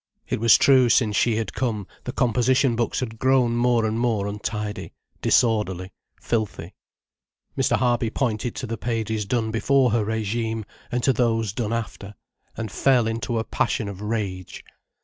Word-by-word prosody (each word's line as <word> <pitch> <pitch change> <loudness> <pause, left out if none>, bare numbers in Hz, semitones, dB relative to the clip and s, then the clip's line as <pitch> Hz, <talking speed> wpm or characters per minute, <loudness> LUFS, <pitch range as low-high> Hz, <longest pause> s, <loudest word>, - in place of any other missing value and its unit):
It - - -2
was 115 0 +6
true, 130 -3 +5
since 110 -2 +3
she 115 +1 +2
had 110 0 -3
come, 110 -6 -2 0.2
the 125 - -3
composition 125 +1 +2
books 120 +3 -1
had 115 -3 -5
grown 130 -3 +3
more 120 -1 +2
and 110 +1 -1
more 115 -5 0
untidy, 105 0 -4 0.3
disorderly, 100 -5 +1 0.3
filthy. 110 -3 -3 0.8
Mr. - - +2
Harby 120 -2 +1
pointed 115 -1 -2
to - - -4
the 115 -2 -5
pages 110 -2 -2
done 110 0 0
before 125 +3 +2
her 115 -1 +2
regime, 110 +1 -2 0.3
and 120 0 -1
to 135 - +4
those 115 -4 0
done 110 -2 -2
after, 105 -3 -5 0.4
and 110 -3 -4
fell 125 -1 +3
into 115 +1 -2
a 110 - 0
passion 110 -1 -1
of 100 -1 -7
rage. 105 -4 -4
115 Hz, 160 wpm, -24 LUFS, 105-120 Hz, 0.8 s, was